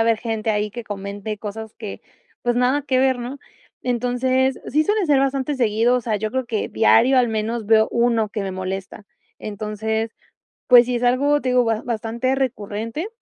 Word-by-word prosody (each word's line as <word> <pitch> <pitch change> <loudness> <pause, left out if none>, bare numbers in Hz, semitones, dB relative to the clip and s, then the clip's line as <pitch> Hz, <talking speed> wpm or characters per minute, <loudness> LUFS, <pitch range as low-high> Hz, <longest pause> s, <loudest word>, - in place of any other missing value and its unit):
haber 225 -1 +2
gente 225 -1 -2
ahí 210 0 0
que 235 +2 -7
comente 205 +1 -5
cosas 220 +1 -7
que, 215 -3 -7 0.4
pues, 240 0 +1
nada 250 +4 +2
que 260 -2 +1
ver, 260 -1 +2
¿no?, 245 +4 -6 0.4
entonces, 250 +2 0
sí 305 +4 +2
suelen 415 -1 +1
ser 285 -3 +4
bastante 275 +1 0
seguido, 235 -1 +2
o 250 - -2
sea, 220 -2 -1
yo 215 +1 -3
creo 260 +2 -1
que 225 -3 -2
diario 235 +4 +4
al 245 -2 +4
menos 220 +1 -2
veo 220 +1 +4
1 235 -2 +2
que 210 -1 -4
me 195 - -3
molesta, 190 +2 -6 0.3
entonces, 215 +2 -3 0.6
pues 245 -1 +7
sí, 250 - -1
es 240 - -2
algo, 280 +4 +3
te 255 - -1
digo, 250 0 +4
ba 225 -1 -1
bastante 235 +2 -1
recurrente, 230 - -3
235 Hz, 185 wpm, -21 LUFS, 215-255 Hz, 0.6 s, pues